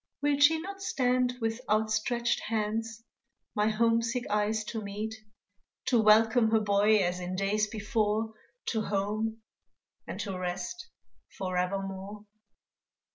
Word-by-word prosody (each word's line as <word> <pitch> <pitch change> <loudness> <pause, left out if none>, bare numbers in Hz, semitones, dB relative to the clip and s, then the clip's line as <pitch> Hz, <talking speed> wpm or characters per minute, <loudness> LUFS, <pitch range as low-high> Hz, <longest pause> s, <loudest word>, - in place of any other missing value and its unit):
Will 290 -1 +2
she 320 +3 +6
not 390 +3 -7
stand 250 -7 +1
with 225 +1 -2
outstretched 220 +3 +1
hands 225 +1 -2 0.5
My 210 0 +2
homesick 230 +2 +1
eyes 210 +1 +1
to 220 +1 -5
meet 210 +2 -4 0.8
To 240 -3 +4
welcome 220 +2 +5
her 220 0 +4
boy 210 +1 +4
as 180 0 -1
in 180 +1 -4
days 205 +3 +1
before, 215 0 -1 0.4
To 220 - 0
home, 215 +2 -2 0.7
and - - -6
to 195 -3 -4
rest, 185 - -4 0.5
forevermore? 195 +2 -3
215 Hz, 120 wpm, -29 LUFS, 205-230 Hz, 0.8 s, she